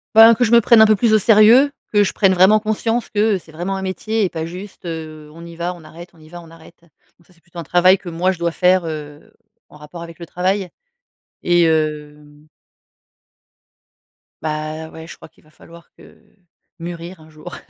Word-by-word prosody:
Ben 225 +1 +8
que 250 - 0
je 225 - 0
me 235 0 +6
prenne 230 +2 +5
un 220 - +8
peu 215 - +3
plus 220 +1 +1
au - - +6
sérieux. 225 +7 +5 0.2
Que 205 -1 +3
je 195 - -3
prenne 195 -2 +2
vraiment 190 +4 +4
conscience 225 +2 -2
que, 210 0 +1
heu, - - -4
c'est 165 - -19
vraiment 175 +5 -5
un - - -6
métier 215 +3 -3
et 185 - 0
pas 160 -2 -5
juste, 185 +2 -11
heu: 155 -2 -8
«On 165 +1 -12
y 170 0 -12
va, 175 +2 -4
on 170 - -16
arrête 170 +3 -13
on 165 - -23
y 155 - -18
va, 175 +1 -11
on 165 - -16
arrête.» 165 +1 -18
Donc 170 +1 -31
ça, 180 - -25
c'est 170 - -29
plutôt 175 0 -13
un - - -6
travail 180 +4 +3
que 175 - -9
moi 175 +3 -1
je 180 - -8
dois 170 0 -1
faire, 180 0 +1
heu, 150 -2 -9 0.4
en - - -16
rapport 150 +3 -12
avec 170 -1 -12
le 170 - -8
travail, 185 +3 -2 0.7
et 175 -1 +2
hem 150 -1 -3 2.0
Bah 155 +1 -5
ouais, 160 0 -12
je - - -11
crois - - -16
qu'il - - -29
va 155 - -25
falloir 170 +1 -18
que - - -21 0.4
mûrir 170 +1 -8
un 155 - -18
jour. 155 0 -11
175 Hz, 220 wpm, -18 LUFS, 160-195 Hz, 2.0 s, Ben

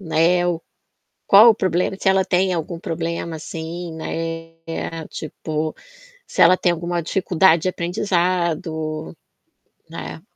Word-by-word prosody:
né, 175 0 +2
o 170 -1 -1 0.6
qual 215 +4 +8
o 220 - +5
problema, 185 -1 0
se 190 - +2
ela 190 0 +3
tem 185 0 +2
algum 165 0 -3
problema, 165 -1 -3
assim, 165 +2 -6
né, 165 0 -5
tipo, 155 0 -4 0.5
se - - -2
ela 180 +1 +8
tem 175 - +2
alguma 170 0 -2
dificuldade 175 -2 +3
de 185 - +2
aprendizado, 170 -3 -1 0.7
né. - - -7
170 Hz, 120 wpm, -21 LUFS, 160-180 Hz, 0.7 s, qual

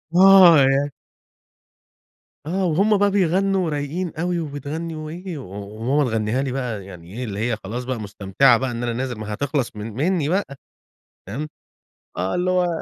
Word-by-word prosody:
آه 185 -3 +8
يعني 135 +1 +3 1.5
آه، 185 +4 -1
وهمّ 195 +6 +3
بقى 200 0 +3
بيغنّوا 195 0 +2
ورايقين 155 +3 -3
اوي 175 +2 -1
وبتغنّي 155 +2 -5
وإيه، 165 +3 -6
و 130 -9 -9 0.3
وماما 130 +3 +1
تغنيها 110 +3 0
لي 135 - -2
بقى 120 -7 -4
يعني 90 -1 -12
إيه 125 - -3
إللّي 100 -3 -5
هي 110 - -1
خلاص 120 +6 -4
بقى 125 -2 -3
مُستمتعة 105 +5 +3
بقى 130 +1 -2
إن 120 0 -4
أنا 120 -1 -1
نازل، 125 +1 -3
ما 110 -1 -6
هي - - -3
هتِخلَص 135 0 -2
من 105 +1 -6
منّي 155 - 0
بقى. 185 -6 -1 0.7
فاهِم، 140 +11 -5 0.7
آه 95 +2 -1
إللّي 180 +1 +1
هو 180 -1 +2
140 Hz, 170 wpm, -22 LUFS, 115-175 Hz, 1.5 s, آه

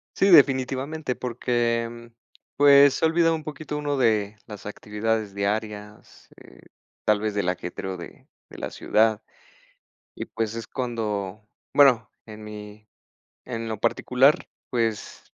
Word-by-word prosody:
Sí, 195 - +3
definitivamente, 135 -1 +3
porque, 120 -1 -1
mm, 120 0 -11 0.5
pues 140 -1 +7
se - - -4
ha - - +6
olvidado 165 0 +3
un 155 -1 -4
poquito 150 -1 -6
uno 145 -1 -1
de 110 -4 +1
las 105 -2 -9
actividades 105 0 -2
diarias, 105 +1 -5
eh, - - -17 0.4
tal 105 -1 +3
vez 110 0 -2
del 100 -3 0
ajetreo 90 +1 -4
de 85 - -12 0.2
de - - -12
la - - -4
ciudad. 110 0 +1 0.9
Y - - -5
pues 115 -1 -3
es 115 -2 -6
cuando, 105 -5 -4 0.3
bueno, 125 -6 +5
en 110 -1 -11
mi 105 0 -10 0.6
en 115 -2 -5
lo 110 - -3
particular, 125 +4 +2 0.2
pues, 115 -4 -2
115 Hz, 135 wpm, -25 LUFS, 105-130 Hz, 0.9 s, pues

